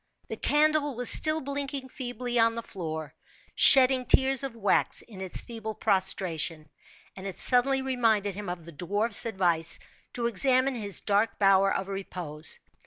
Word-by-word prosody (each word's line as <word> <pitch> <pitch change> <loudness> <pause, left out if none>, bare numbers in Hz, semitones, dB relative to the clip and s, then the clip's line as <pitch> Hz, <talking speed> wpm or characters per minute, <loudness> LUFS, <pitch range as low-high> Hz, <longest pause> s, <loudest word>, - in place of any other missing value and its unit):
The - - -4
candle 300 -2 +1
was 245 0 +1
still 310 0 +2
blinking 280 -1 -4
feebly 245 -1 -4
on 230 0 +3
the 230 - -5
floor, 160 -6 -7 0.4
shedding 260 -1 +5
tears 265 -1 +3
of 270 -4 -5
wax 205 -3 +1
in 200 -5 -12
its 190 -2 +3
feeble 220 -2 -7
prostration, 175 -6 -1 0.5
and 195 +1 -8
it 195 - -7
suddenly 265 +2 +3
reminded 225 -6 0
him 200 0 -7
of 175 -2 -7
the 170 - -11
dwarf's 205 +8 0
advice 175 -6 -1 0.4
to 240 - -3
examine 255 +4 +2
his 205 -5 -2
dark 205 +1 0
bower 195 -1 +3
of 195 - -3
repose. 180 -6 -3
220 Hz, 155 wpm, -27 LUFS, 190-255 Hz, 0.5 s, shedding